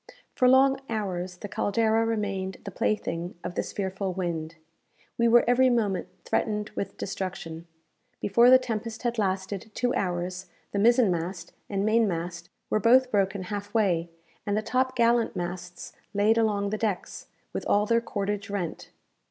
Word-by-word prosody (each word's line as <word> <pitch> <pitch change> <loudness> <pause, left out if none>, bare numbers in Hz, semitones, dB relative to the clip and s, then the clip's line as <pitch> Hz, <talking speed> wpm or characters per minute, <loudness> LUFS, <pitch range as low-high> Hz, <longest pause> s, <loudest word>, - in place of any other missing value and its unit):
For 255 - +3
long 265 +1 +5
hours 185 -5 -3
the 205 - -7
"Caldera" 220 +3 +1
remained 195 -4 -2
the 200 - -5
plaything 175 -3 -2
of - - -4
this - - -3
fearful 190 -1 -3
wind. 165 -3 -3 0.6
We 235 - +3
were 235 +1 +6
every 255 +1 +5
moment 210 -7 0 0.2
threatened 210 -1 -1
with 200 - -5
destruction. 175 -4 -5 0.5
Before 235 +5 +5
the 255 - +9
tempest 230 -2 -4
had 240 -1 -1
lasted 195 +1 -2
two 245 0 0
hours 180 0 -2 0.2
the 200 - -1
mizen 235 -1 +5
mast 170 +1 -4 0.2
and 195 0 -1
main 225 +1 +3
mast 170 -1 -4 0.2
were 215 - +3
both 250 +4 +5
broken 195 -1 +1
half 205 +3 -6
way, 175 -6 +2 0.3
and 205 0 -1
the 215 - -1
top 255 +3 0
gallant 235 -2 +3
masts 180 0 -6 0.2
laid 210 +2 +4
along 205 -2 +1
the 215 - -2
decks, 210 -5 -3 0.3
with - - -3
all 205 +1 +3
their 230 +2 +2
cordage 205 -2 -3
rent. 195 -5 -4
205 Hz, 160 wpm, -27 LUFS, 185-230 Hz, 0.6 s, the